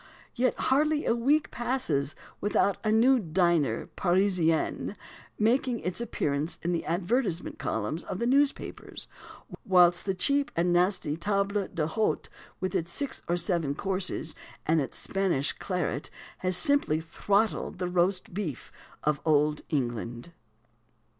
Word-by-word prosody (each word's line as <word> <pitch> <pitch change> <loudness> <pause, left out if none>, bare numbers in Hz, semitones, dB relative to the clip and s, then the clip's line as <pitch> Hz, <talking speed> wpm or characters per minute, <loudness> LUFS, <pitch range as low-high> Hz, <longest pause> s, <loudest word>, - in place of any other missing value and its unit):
Yet 250 0 +1
hardly 300 +3 +2
a - - +3
week 275 +6 +2
passes 240 - -1 0.2
without 200 -1 +1
a 215 - +1
new 245 +4 +5
dîner 170 - +1
Parisien 180 -1 +1 0.4
making 240 +2 +2
its 180 +5 -3
appearance 150 -8 -2
in 175 - 0
the 170 - -1
advertisement 180 +2 -1
columns 110 +10 -2
of - - -4
the 235 - -1
newspapers; 275 +3 0 0.6
whilst 175 -2 +4
the 195 -1 0
cheap 280 +8 +2
and 175 +1 +2
nasty 180 -4 +2
table 200 +1 0
d'hôte, 165 +7 -1 0.3
with 185 - -2
its 165 +1 -1
six 280 +8 -3
or 175 - +1
seven 170 -5 0
courses 185 -3 -1 0.3
and 160 0 +3
its 135 - -5
Spanish 185 -8 0
claret, 175 -6 -3 0.3
has 185 -1 +1
simply 285 - +3
throttled 200 +7 0
the 180 0 -2
Roast 180 +1 0
Beef 175 - -4 0.3
of 150 0 +1
Old 150 -1 +2
England. 120 -1 -3
180 Hz, 130 wpm, -28 LUFS, 160-220 Hz, 0.6 s, new